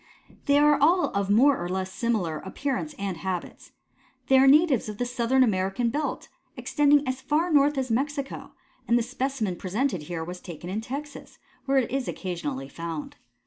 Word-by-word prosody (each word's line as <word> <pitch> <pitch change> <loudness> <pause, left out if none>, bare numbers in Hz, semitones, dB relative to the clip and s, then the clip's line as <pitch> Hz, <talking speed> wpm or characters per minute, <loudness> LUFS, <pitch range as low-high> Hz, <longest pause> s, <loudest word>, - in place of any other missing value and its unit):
They 285 0 +4
are 295 -1 +4
all 345 +5 +4
of 200 -1 -1
more 250 0 +4
or 175 - -4
less 190 0 -3
similar 195 -10 -1
appearance 280 +8 -4
and 195 -3 -3
habits. 185 0 -5 0.6
They 265 0 +6
are 270 - +6
natives 285 -5 +4
of 210 - -6
the 245 - -1
southern 245 +2 +2
American 200 +2 0
belt, 295 +3 -3 0.3
extending 290 -1 +3
as 260 0 -2
far 310 +5 0
north 290 0 +4
as 260 -2 -1
Mexico, 275 +3 -3 0.3
and 235 - +4
the 240 - +1
specimen 250 -6 -2
presented 200 - -1
here 165 +1 -5
was 180 +2 -7
taken 175 0 -8
in 210 +3 -2
Texas, 280 +5 -8 0.3
where 275 0 +2
it 255 -4 +1
is 270 -1 -2
occasionally 150 -8 -4
found. 165 +1 -6
245 Hz, 175 wpm, -26 LUFS, 185-280 Hz, 0.6 s, They